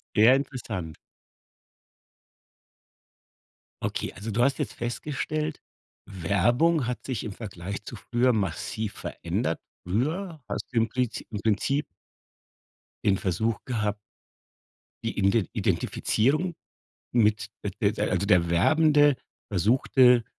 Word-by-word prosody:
Sehr 115 +5 +7
interessant. 110 - -4 2.9
Okay, - - -2
also 105 +4 -6
du 115 - +1
hast 135 +1 +2
jetzt - - -2
festgestellt, 150 +5 -3 0.4
Werbung 120 - +2
hat 125 0 -4
sich 130 -5 -3
im 110 - -4
Vergleich 100 -2 -6
zu - - -7
früher 120 +3 +1
massiv 110 +1 -2
verändert. - - -2 0.3
Früher 155 - -1
hast 100 - -3
du - - -1
im 115 0 +3
Prizi 125 -1 -2
im 105 - -4
Prinzip 115 +7 +1 1.2
den 100 -2 +4
Versuch 100 +5 -1
gehabt 105 -4 -1 1.1
die 115 - -3
Iden 100 -1 +4
die 110 -5 +1
Identifizierung 155 +10 +1 0.6
mit, 115 -1 +3
äh, - - -2
de - - +3
de - - -1
also, 100 - +1
der 90 -4 +4
Werbende 145 - +5 0.3
versuchte, 120 +4 +4
115 Hz, 115 wpm, -27 LUFS, 100-135 Hz, 2.9 s, Sehr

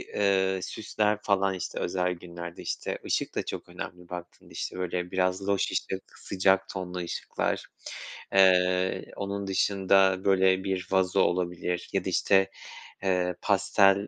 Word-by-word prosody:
eee, 95 -2 +2
süsler 105 -1 0
falan 95 -1 +2
işte 95 - -4
özel 90 0 0
günlerde, 85 -1 -8
işte, - - -3
ışık - - -1
da - - -1
çok - - -6
önemli 90 -1 -8
baktığında, 90 -1 -9
işte, - - -5
böyle 90 0 -2
biraz 95 +1 0
loş 100 0 +1
ışık, 95 0 -4
sıcak 95 0 +2
tonlu 90 -1 -5
ışıklar, 85 -1 -2 0.7
eee, 90 -1 +4
onun 100 0 -3
dışında 95 -1 +3
böyle 95 -1 +4
bir 95 -1 -2
vazo 95 -1 +3
olabilir 90 0 -1
ya 95 -2 0
da, - - 0
işte, 95 +1 +3 0.5
eee, 90 -2 +1
pastel 100 0 +4
95 Hz, 135 wpm, -28 LUFS, 90-95 Hz, 0.7 s, eee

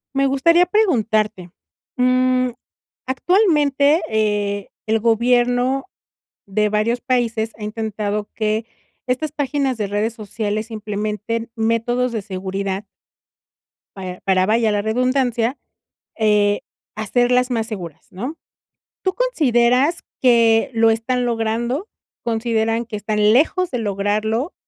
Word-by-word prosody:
Me 275 0 +3
gustaría 335 +7 +4
preguntarte, 220 - +1 0.5
mm, 255 0 +3 0.6
actualmente, 295 -1 +3
eh, 205 -2 0 0.2
el 220 0 +1
gobierno 245 +3 +2 0.6
de 210 +2 +1
varios 215 +3 +1
países 235 -3 0
ha 215 - -8
intentado 210 -1 -3
que 215 0 -1 0.4
estas 265 +4 -1
páginas 275 -3 -1
de 210 -2 -2
redes 210 +3 -1
sociales 215 0 -4
implementen 215 +2 -3
métodos 230 +2 0
de 225 -2 -3
seguridad 195 +1 -4 1.1
para 185 -2 -7
para, 185 -1 +2
vaya 220 +1 +2
la 205 -1 +1
redundancia, 245 +2 0 0.6
eh, 210 -2 +2 0.3
hacerlas 245 +4 +1
más 225 -2 -1
seguras, 170 -8 -8
¿no? 255 - -5 0.7
¿Tú 375 - +1
consideras 285 - +2 0.2
que 230 -3 +4
lo 225 0 +4
están 240 +3 0
logrando? 235 - -1 0.4
¿Consideran 225 0 0
que 225 - -7
están 210 0 +2
lejos 335 +7 +2
de 250 - -1
lograrlo? 215 - -1
230 Hz, 110 wpm, -20 LUFS, 210-255 Hz, 1.1 s, gustaría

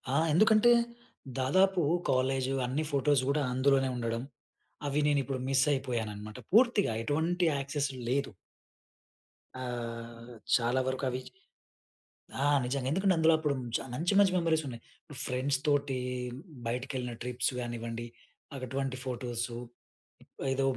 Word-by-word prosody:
ఆ! - - +4 0.2
ఎందుకంటే 215 +6 +6 0.7
దాదాపు 185 +8 +3 0.3
కాలేజ్, 130 0 +1 0.2
అన్ని 135 +5 -1
ఫోటోస్ 140 -1 +3
కూడా 150 +2 +2
అందులోనే 135 +1 +3
ఉండడం. 115 -1 -2 0.7
అవి 140 +1 +1
నేను 145 -1 +3
ఇప్పుడు 130 0 -3
మిస్ 135 +1 +4
అయిపోయానన్నమాట. 110 -4 -3 0.2
పూర్తిగా 230 - +5
ఎటువంటి 165 +7 +1
యాక్సెస్ 140 +1 -1 0.2
లేదు. 140 +2 +1 1.3
ఆహ్, 115 -1 -6 0.2
చాలా 120 +2 +2
వరకు 130 +1 -2
అవి 130 +1 -3 1.2
ఆ! - - +3 0.2
నిజంగా. 130 +1 -2
ఎందుకంటే, 190 +4 +3
అందులో 160 0 +5
అప్పుడు 150 -2 0 0.2
చ - - +2
మంచి, 170 +9 0
మంచి 200 -2 +5
మెమరీస్ 160 -2 +2
ఉన్నాయి. 120 -3 -7 0.4
ఫ్రెండ్స్‌తోటి, 140 +1 0 0.7
బయటికి 125 +3 -2
వెళ్ళిన 125 -2 -3
ట్రిప్స్ 125 +1 -1
కానివ్వండి, 120 -1 -4 0.5
అటువంటి 135 +1 -3
ఫోటోసు, 120 -2 -3 0.9
ఏదో 135 +1 +1
135 Hz, 115 wpm, -30 LUFS, 125-145 Hz, 1.3 s, ఎందుకంటే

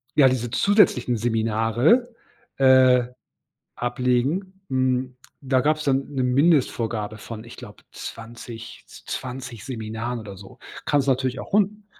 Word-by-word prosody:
ja, 140 -3 +7
diese 120 -2 0
zusätzlichen 165 - +3
Seminare, 115 - +1 0.4
äh, 130 -2 +6 0.7
ablegen. 130 +10 -1
Hm, 130 -1 0 0.3
da 130 -2 +1
gab's 155 +1 0
dann 135 0 +1
'ne 130 -2 0
Mindestvorgabe 120 -6 +1
von 110 0 -8
ich 120 - -11
glaube 105 -4 -12
20- 115 0 -9
20 125 -3 -7
Seminaren 115 -1 -4
oder 100 -3 -9
so. 95 0 -14 0.3
Kann 145 - +2
es 140 - -1
natürlich 130 -1 0
auch - - -9
hun 210 +1 +1
125 Hz, 125 wpm, -23 LUFS, 115-135 Hz, 0.7 s, ja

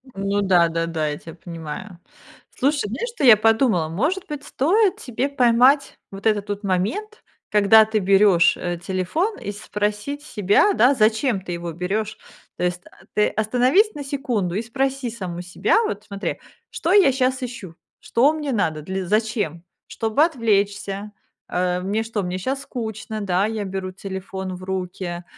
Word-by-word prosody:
Ну 200 +1 0
да-да-да, 165 -4 +2
я 145 - -4
тебя 165 +1 -11
понимаю. 170 +2 -8 0.6
Слушай, 280 -4 +1
знаешь, 265 - -3
что - - -3
я 235 -5 +9
подумала, 220 -7 +2
может 300 - -1
быть, 295 -1 -6
стоит 380 - +2
тебе 255 +2 -3
поймать 260 +2 +3
вот 195 +1 -10
этот 205 -2 +1
вот 205 +1 -4
момент, 210 - -2 0.3
когда 215 +1 +6
ты 220 0 0
берешь, 195 -2 +4
э, 175 -1 -3
телефон, 190 - -2
и 205 - -5
спросить 210 +6 -3
себя, 210 - +2
да, 265 -4 +5
зачем 220 -1 +2
ты 180 -1 -6
его 170 0 -5
берешь, 200 +6 -3 0.4
То - - -3
есть 180 0 -2 0.3
ты 210 - +4
остановись 250 - +2
на 290 - -5
секунду 245 - -2
и 210 - 0
спроси 265 +2 -2
саму 185 -6 -6
себя, 180 - +1
вот 205 - -3
смотри: 200 0 -4 0.3
"Что 335 - -2
я 385 -8 +6
сейчас 260 0 0
ищу? 235 -9 -7 0.2
Что 270 +6 +2
мне 300 -3 -3
надо? 160 -10 0
Для 190 +3 -4
Зачем? 210 -5 -1 0.2
Чтобы 225 +6 +1
отвлечься? 205 - -1 0.4
Э, 180 0 0
мне 205 +4 -1
что, 225 -2 -3
мне 180 +1 -3
сейчас 265 +8 -3
скучно? 220 -2 -5
Да, 190 -1 +1
я 220 -1 -3
беру 190 -1 -4
телефон 190 0 -6
в 185 - -11
руки, 180 -2 -4
210 Hz, 160 wpm, -22 LUFS, 185-255 Hz, 0.6 s, я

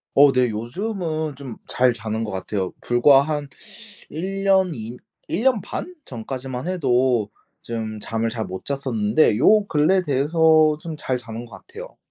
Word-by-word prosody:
어 140 0 +7
네 125 -2 +2
요즘은 155 - -3
좀 130 -4 -8
잘 125 0 +3
자는 110 0 -4
거 105 - -4
같아요. 95 0 -3
불과 135 +3 +5
한 145 -1 -3 0.6
1 195 +5 -4
년 190 -2 +3
2 115 +1 -7 0.3
1 190 - -2
년 260 -4 +3
반 360 - -6
전까지만 130 +3 -6
해도 125 - +1 0.3
좀 110 -2 -5
잠을 115 +2 -2
잘 110 -2 -4
못 95 0 -7
잤었는데 120 -4 +1
요 210 - +5
근래 180 +2 +2
돼서 155 +2 +3
좀 165 0 -6
잘 130 -3 -2
자는 115 -1 -8
거 115 - -11
같아요. - - -12
135 Hz, 235 characters per minute, -22 LUFS, 115-160 Hz, 0.6 s, 어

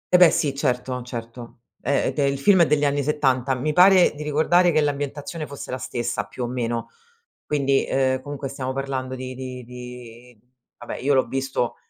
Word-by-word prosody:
Eh - - +9
beh, 180 -2 +8
sì 145 -2 0
certo, 125 -2 -1
certo, 120 -1 -8 0.2
ehm 140 +2 +1
ed - - -5
e 140 - +3
il 140 0 0
film 185 +6 +5
è 165 - +5
degli 150 -1 +2
anni 145 0 +1
70 135 -3 +1
mi 150 +4 -1
pare 185 +2 +6
di 150 - -9
ricordare 160 +4 +3
che 155 - +2
l'ambientazione 145 +2 -3
fosse 140 - -8
la 130 - -3
stessa, 120 -4 -3
più 125 - -7
o - - -1
meno. 120 -1 -3 0.6
Quindi, 140 -2 +1
uhm, 130 -1 +1
comunque 145 -1 -5
stiamo 130 -1 -4
parlando 135 -1 -3
di 130 0 -6
di 130 -1 -7
di 125 -1 -11 0.4
vabbè 120 - -6
io 140 +2 +1
l'ho 130 -1 +3
visto, 135 -2 -2
135 Hz, 190 wpm, -23 LUFS, 125-145 Hz, 0.6 s, Eh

